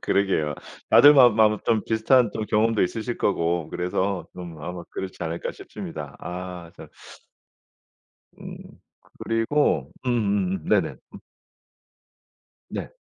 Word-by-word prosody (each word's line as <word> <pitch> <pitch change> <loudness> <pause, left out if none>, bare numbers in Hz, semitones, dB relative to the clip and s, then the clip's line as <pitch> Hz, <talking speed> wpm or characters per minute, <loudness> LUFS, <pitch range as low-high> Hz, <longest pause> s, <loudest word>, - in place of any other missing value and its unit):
그러게요. 95 -7 0 0.4
다들 145 +1 +8
마 130 -3 +8
아마 110 -2 +3
좀 110 -3 +2
비슷한 115 +1 +3
또 110 - -3
경험도 110 +1 +2
있으실 115 +5 -3
거고 85 -4 0
그래서 95 +2 -2
좀 85 -3 -9
아마 90 +2 -6
그렇지 95 -1 -6
않을까 85 +1 -4
싶습니다. 75 -3 -8
아 90 -1 -7
참. - - -11 1.5
음. - - -8 0.7
그리고 115 +7 +1 0.2
음음음. 120 - 0
네네. - - +3 0.2
음. - - -8 1.5
네. - - -5
100 Hz, 235 characters per minute, -24 LUFS, 90-115 Hz, 1.5 s, 다들